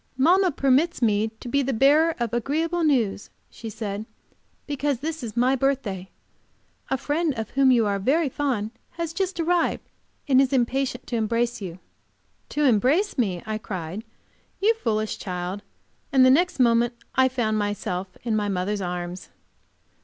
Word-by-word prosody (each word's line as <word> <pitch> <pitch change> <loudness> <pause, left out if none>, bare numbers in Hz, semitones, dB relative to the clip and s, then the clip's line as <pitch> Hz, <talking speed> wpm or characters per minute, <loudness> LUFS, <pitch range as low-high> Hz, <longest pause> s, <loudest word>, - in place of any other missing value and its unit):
"Mamma 360 +7 +4
permits 280 +3 +2
me 215 -1 +2
to - - -8
be 280 +3 +1
the 270 0 -1
bearer 295 +7 +4
of 235 -2 -2
agreeable 320 +8 0
news," 235 -10 +1 0.2
she 225 - -8
said, 210 0 -5 0.6
"because 285 -2 -1
this 320 +2 -4
is 235 -1 -7
my 255 +3 +3
birthday. 240 -9 -1 0.8
A 265 - +1
friend, 295 +2 -1
of 225 -1 -5
whom 270 -1 +4
you 240 -3 +4
are 200 -1 0
very 290 - +2
fond, 250 -6 -2 0.2
has 335 -1 -4
just 375 0 -2
arrived, 340 +1 +1 0.4
and 265 -2 +5
is 270 0 +1
impatient 260 0 0
to 240 - -2
embrace 230 +1 0
you. 180 -3 -6 0.7
"To 300 - -1
embrace 275 - +2
me?" 190 -7 0
I 215 0 -3
cried. 185 0 -5 0.6
"You 430 +4 +4
foolish 220 - -2
child!" 180 +1 -4 0.5
And 265 -1 +6
the 255 - +7
next 350 +3 +2
moment 240 -1 +3 0.2
I 260 0 +4
found 220 -4 0
myself 195 -2 -3
in 230 -2 0
my 205 -1 0
mother's 195 +2 -1
arms! 180 0 -5
245 Hz, 160 wpm, -24 LUFS, 210-285 Hz, 0.8 s, the